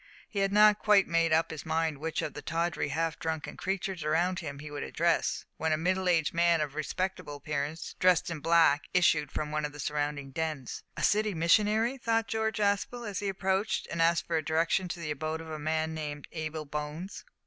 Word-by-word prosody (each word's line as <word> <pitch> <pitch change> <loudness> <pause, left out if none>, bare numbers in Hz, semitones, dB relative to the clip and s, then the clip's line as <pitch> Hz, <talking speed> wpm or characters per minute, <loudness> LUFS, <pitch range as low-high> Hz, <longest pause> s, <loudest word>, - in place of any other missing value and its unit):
He 205 - -4
had 195 0 +2
not 210 0 +6
quite 210 -2 +5
made 165 -1 +2
up 160 +1 +3
his 160 - -6
mind 160 -2 -1
which 160 +1 -2
of 150 - -4
the 150 - -7
tawdry, 165 +1 -1
half 165 +1 -1
drunken 160 -2 -3
creatures 190 -2 -3
around 175 +4 +1
him 140 -4 -6
he 150 +1 -9
would 145 -1 -5
address, 170 0 0
when 160 0 0
a 155 - +3
middle 185 +3 +1
aged 165 -3 +2
man 170 0 +3
of 150 -2 -2
respectable 155 0 -3
appearance, 145 +2 -4
dressed 180 -2 +3
in 165 - -4
black, 165 -2 +4
issued 155 -5 +3
from 150 -1 -3
one 150 0 -1
of 145 0 -3
the 145 - -11
surrounding 145 -1 -2
dens. 155 -3 -3 0.2
"A - - -3
city 210 -1 +2
missionary," 215 +9 +3
thought 225 -1 +1
George 220 -1 -1
Aspel, 210 +3 0
as 200 -2 -3
he 200 - -2
approached, 190 +2 0
and 170 - -1
asked 170 +1 +3
for 165 -2 0
direction 165 +4 +1
to 175 0 -5
the 155 -3 -3
abode 155 +2 -3
of 160 0 -8
a 155 - -5
man 160 +1 -1
named 150 -2 -5
Abel 155 -1 -4
Bones. 150 +6 -5
165 Hz, 205 wpm, -30 LUFS, 150-185 Hz, 0.2 s, not